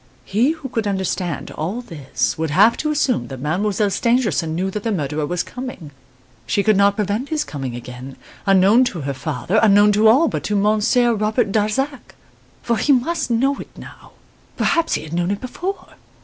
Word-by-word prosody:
He 235 +10 +2
who 320 -4 -8
could 225 -4 -2
understand 190 -3 -2
all 185 +10 -4
this, 155 - -3
would 160 0 -2
have 205 +10 +5
to 305 - -2
assume 280 -5 0
that 135 -2 -8
Mademoiselle 200 - 0
Stangerson 210 - +1
knew 190 +3 -1
that 210 - -4
the 225 - -2
murderer 150 -4 -2
was 175 +2 -1
coming 250 - -8 0.6
she 200 +12 +1
could 215 0 +3
not 200 +1 +4
prevent 210 +6 -2
his 310 -2 0
coming 135 - -6
again 125 +2 -9 0.3
unknown 195 +5 +5
to 180 -9 -4
her 140 0 -3
father, 140 - -1
unknown 205 -1 +5
to 210 +2 +4
all 270 +9 +5
but - - -3
to 210 - -1
Monsieur 215 +4 +2
Robert 215 0 0
Darzac. 240 +7 -2 0.5
For 235 -1 0
he 295 - +2
must 300 +4 +1
know 270 +4 +1
it - - -8
now - - -13 0.4
perhaps 335 -1 +1
he - - -4
had 155 - -9
known 175 +1 0
it 200 0 -1
before! 355 +10 -5
210 Hz, 185 wpm, -20 LUFS, 170-245 Hz, 0.6 s, have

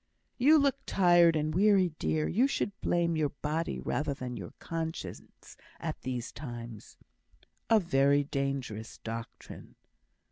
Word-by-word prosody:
"You 295 +6 +6
look 280 -2 +2
tired 175 -3 +5
and 155 0 0
weary, 195 0 +4
dear. 155 -1 0
You 245 +8 +3
should 210 - -1
blame 170 -1 +1
your 155 -2 +1
body 155 +4 -3
rather 145 -1 -2
than 125 -2 -6
your 95 -6 -7
conscience 165 0 -6 0.2
at - - -5
these 125 -2 -4
times." 120 -6 -9 0.7
"A 225 - +6
very 140 -5 +3
dangerous 135 -6 -3
doctrine." 115 +1 -8
155 Hz, 130 wpm, -30 LUFS, 130-175 Hz, 0.7 s, You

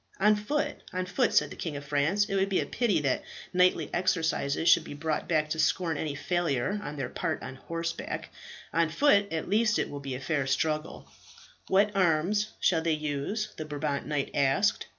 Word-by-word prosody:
"On 210 +2 +5
foot, 290 +8 -1 0.2
on 185 0 -1
foot," 195 +7 +1
said - - +3
the - - -7
King 160 -4 -4
of 145 - -8
France. 150 +8 +2
"It - - -4
would 195 0 +2
be 190 - +2
a - - -1
pity 210 -10 +1
that 135 -3 0 0.3
knightly 180 -3 +3
exercises 165 -4 0
should 165 - +6
be 145 - -8
brought 155 +1 -2
to 155 -1 +1
scorn 165 +2 +2
by 145 - -3
any 150 -3 -3
failure 175 +2 0
on 150 - -5
their 135 - -2
part - - -3
on 130 - -6
horseback. 165 +3 -4 0.4
On 165 -1 +2
foot 200 - +3
at 160 -1 -2
least 215 +2 +2
it - - -1
will 145 - -5
be 135 -2 -5
a - - -5
fair 140 -1 -1
struggle." 155 +3 -1 0.6
"What 200 +2 +3
arms 185 +3 +2
shall 165 -3 +3
they 165 0 +1
use?" 155 +8 -2
the 155 - -4
Brabant 145 -1 -3
knight 145 -2 -1
asked. 140 +9 +2
165 Hz, 195 wpm, -28 LUFS, 150-195 Hz, 0.6 s, should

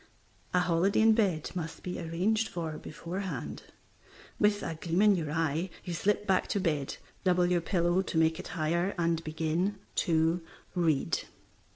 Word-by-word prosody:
A 180 - +3
holiday 180 +3 +2
in 220 0 +6
bed 190 -9 +1
must 165 -3 -5
be 180 - -4
arranged 185 +7 0
for 160 -3 -4
beforehand. 185 +5 -5 0.8
With 210 -1 +3
a 165 - -2
gleam 170 +4 0
in 210 -2 +6
your 160 -4 -2
eye 165 +2 0 0.2
you 175 - -3
slip 205 +4 +1
back 190 -2 +2
to 200 - 0
bed, 150 -7 -1 0.3
double 180 -1 +3
your 175 -1 +2
pillow 175 +1 +2
to 190 -3 -3
make 160 0 +3
it - - -6
higher, 170 +5 +1
and 165 -1 +1
begin 160 +5 -1 0.2
to 165 +1 +2 0.3
read. 165 -6 +1
175 Hz, 160 wpm, -30 LUFS, 160-190 Hz, 0.8 s, in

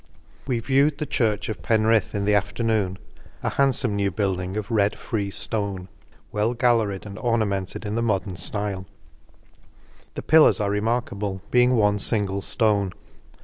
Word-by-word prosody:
We 125 -3 0
viewed 140 +5 +2
the 150 - -3
Church 110 -6 0
of 110 - -5
Penrith 110 -3 +2
in 100 -1 -1
the 105 - +3
afternoon, 100 -1 0 0.5
a - - +1
handfome 130 -5 +1
new 100 -1 +1
build 95 -1 -1
ing 95 +3 -4
of 105 0 -4
red 105 -2 +2
free 100 -3 -3
ftone, 100 -2 -4 0.4
well 110 +3 0
galleried, 115 -5 +1
and 100 +1 -8
ornamented 110 -4 -1
in 105 - -3
the 115 - 0
modern 100 -5 0
flile; 95 +2 -3 0.6
— - - -30
the - - -5
pillars 155 -5 +5
are 100 -1 0
remarkable, 105 -3 -2
being 125 +1 +4
one 105 -2 +2
fingle 100 -2 -1
ftone. 100 -3 +1
105 Hz, 155 wpm, -24 LUFS, 100-115 Hz, 0.6 s, pillars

